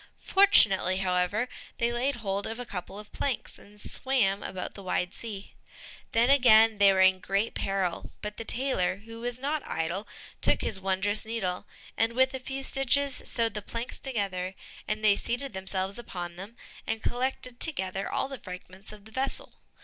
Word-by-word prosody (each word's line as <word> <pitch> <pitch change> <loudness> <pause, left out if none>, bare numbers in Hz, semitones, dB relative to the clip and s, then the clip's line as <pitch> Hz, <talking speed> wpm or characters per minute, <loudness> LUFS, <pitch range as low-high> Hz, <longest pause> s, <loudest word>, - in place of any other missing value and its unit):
Fortunately, 215 - +5
however, 190 +5 +1 0.3
they 235 0 +1
laid 260 +4 0
hold 200 -3 -3
of 225 +2 -5
a 245 - -4
couple 195 -1 -6
of 210 0 -11
planks, 270 -4 -3
and 210 +1 -17
swam 210 -6 +1
about 185 - -5
the 200 - -10
wide 180 0 -1
sea. 205 -4 -7 0.6
Then 235 +3 +4
again 225 -5 +6
they 200 -1 +7
were 190 -1 +3
in 190 0 +6
great 195 +4 0
peril, 195 -3 -2
but 210 0 -5
the - - -4
tailor, 220 -7 0
who 230 0 -9
was 240 +1 -3
not 285 +3 -1
idle, 170 +6 -3 0.3
took - - +4
his 195 - -1
wondrous 195 +2 +1
needle, 210 -5 -3 0.3
and 225 +1 +2
with 260 +2 +3
a 265 - -3
few 270 +1 -5
stitches 270 +1 +1
sewed 230 -2 0
the 210 - -4
planks 230 +4 -4
together, 195 -7 -2 0.3
and 215 +1 -2
they 210 -2 +6
seated 245 +4 -3
themselves 190 +2 -2
upon 175 -7 -6
them, 200 +6 -9 0.3
and 225 -1 -2
collected 250 0 -2
together 195 - +1
all - - 0
the 270 -2 -7
fragments 185 +1 -9
of 210 -1 -13
the 220 - -14
vessel. 265 +4 -3
215 Hz, 175 wpm, -28 LUFS, 190-245 Hz, 0.6 s, they